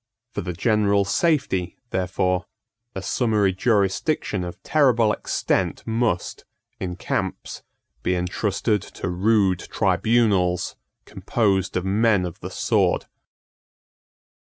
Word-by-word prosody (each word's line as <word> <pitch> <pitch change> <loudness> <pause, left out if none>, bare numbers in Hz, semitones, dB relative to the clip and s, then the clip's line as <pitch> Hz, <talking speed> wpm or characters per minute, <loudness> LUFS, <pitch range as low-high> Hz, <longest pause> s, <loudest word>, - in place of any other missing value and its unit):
For - - -3
the 90 0 -4
general 100 +1 +2
safety, 100 - 0
therefore, 90 -1 0 0.5
a 95 - -4
summary 105 -6 +1
jurisdiction 100 - 0
of 90 -1 -7
terrible 120 -8 +3
extent - - -1
must, 115 -6 -1 0.4
in 90 -2 -4
camps, - - -3 0.4
be 90 - 0
entrusted 100 +3 0
to - - -7
rude 95 0 +2
tribunals 100 -7 +1 0.3
composed 95 -5 0
of 90 - -2
men 100 -1 +2
of 85 - -7
the - - -6
sword. - - +1
100 Hz, 105 wpm, -23 LUFS, 90-110 Hz, 0.5 s, terrible